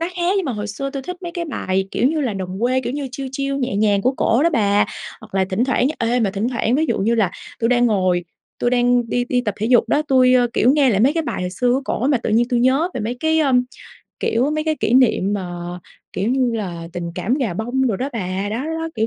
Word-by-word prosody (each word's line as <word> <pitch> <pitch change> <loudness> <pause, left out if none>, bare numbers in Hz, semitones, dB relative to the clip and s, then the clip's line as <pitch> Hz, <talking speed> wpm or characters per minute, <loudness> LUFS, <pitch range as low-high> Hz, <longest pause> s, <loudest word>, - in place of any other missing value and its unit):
nó 335 - 0
khác, 350 +1 +1
nhưng 390 - 0
mà 270 - -2
hồi 210 -1 -4
xưa 275 +6 -4
tui 275 -1 -5
thích 360 +6 -6
mấy 345 -1 -5
cái 340 0 -3
bài, 190 - -2
kiểu 245 - +2
như 315 +1 -1
là, 255 -6 -1
đồng 190 0 -5
quê, 255 +2 +2
kiểu 240 -1 -4
như, 285 -1 -4
chill, 270 0 -5
chill 275 0 -2
nhẹ 250 -7 -2
nhàng 205 -1 +2
của 255 +4 +2
cổ 235 +5 +2
đó 335 - +3
bà. 205 -7 +3 0.4
Hoặc - - -15
là 190 - +2
thỉnh 190 +5 0
thoảng 260 0 +1
ê, 240 +1 +1
mà 210 -4 +1
thỉnh 205 +4 -2
thoảng 240 -1 0
ví 310 +4 +2
dụ - - 0
như 215 +4 +1
là 215 -6 +2 0.3
tui 230 - +2
đang 245 0 +3
ngồi, 185 -5 +1 0.3
tui 240 - +1
đang 245 -1 +2
đi 245 +1 0
đi 250 - +2
tập 210 -5 -3
thể 215 - -1
dục 240 -1 +4
đó, 295 - +2
tui, 255 -3 +4
ơ, 245 -1 +4
kiểu, 250 +2 +4
nghe 285 -3 +4
lại 200 -3 +1
mấy 265 +6 +4
cái 330 - -1
bài 305 - -4
hồi 180 - -3
xưa 245 +7 0
của 265 +2 0
cổ 255 - -1
mà 280 -3 +3
tự - - -2
nhiên 235 +3 +2
tui 245 -1 +1
nhớ 265 +7 +3
về - - -3
mấy 235 +4 -3
cái, 320 0 +2
ơm, 260 -4 +3 0.6
kiểu, 245 +5 +1
mấy 310 0 -1
cái 315 -1 0
kỷ - - 0
niệm 240 -6 +3
mà, 190 -3 -3 0.6
kiểu 195 +4 -1
như 255 -1 +2
là, 170 -5 -5
tình 175 -1 -4
cảm 235 +9 0
gà 250 - -1
bông 245 +7 -1
đồ 220 -6 0
đó 260 +7 -2
bà. 190 -2 -3
Đó, 220 - -2
đó, 315 - -4
đó, 325 0 -3
kiểu, 220 0 0
245 Hz, 285 wpm, -20 LUFS, 210-270 Hz, 0.6 s, dục